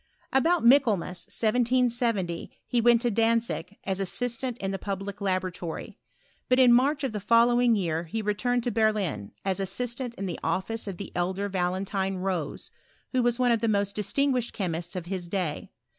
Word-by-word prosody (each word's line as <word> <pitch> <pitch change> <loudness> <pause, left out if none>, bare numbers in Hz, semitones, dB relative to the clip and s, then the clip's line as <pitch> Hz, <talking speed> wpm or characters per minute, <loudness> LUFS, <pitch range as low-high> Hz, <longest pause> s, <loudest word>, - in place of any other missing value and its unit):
About 325 +2 +3
Michaelmas, 220 -9 +3
1770, 235 -6 0 0.2
he 240 - +1
went 240 0 +4
to 240 - +2
Dantzig, 225 -4 0
as 190 0 -2
assistant 245 +5 -2
in 195 -3 -3
the 195 - -3
public 195 0 -5
laboratory: 185 -3 -3 0.5
but 255 - +4
in 250 -2 +7
March 280 +4 +3
of 265 - 0
the 210 - -3
following 235 +3 +4
year 170 -4 -1
he 220 +7 -4
returned 245 +4 0
to 245 - -1
Berlin, 210 - 0
as 195 0 0
assistant 235 +5 -3
in 195 - -4
the 175 -3 -4
office 190 +7 -2
of 190 -3 -5
the 200 - -7
elder 185 +3 -1
Valentine 190 +1 -1
Rose, 180 -5 -3 0.4
who 255 - +2
was 240 -1 +1
one 250 -1 +3
of 230 -2 +2
the 230 - +1
most 200 -2 +1
distinguished 250 +4 0
chemists 175 -3 -3
of 180 -2 -4
his 180 -1 -4
day. 175 -5 -3
210 Hz, 170 wpm, -27 LUFS, 185-240 Hz, 0.5 s, in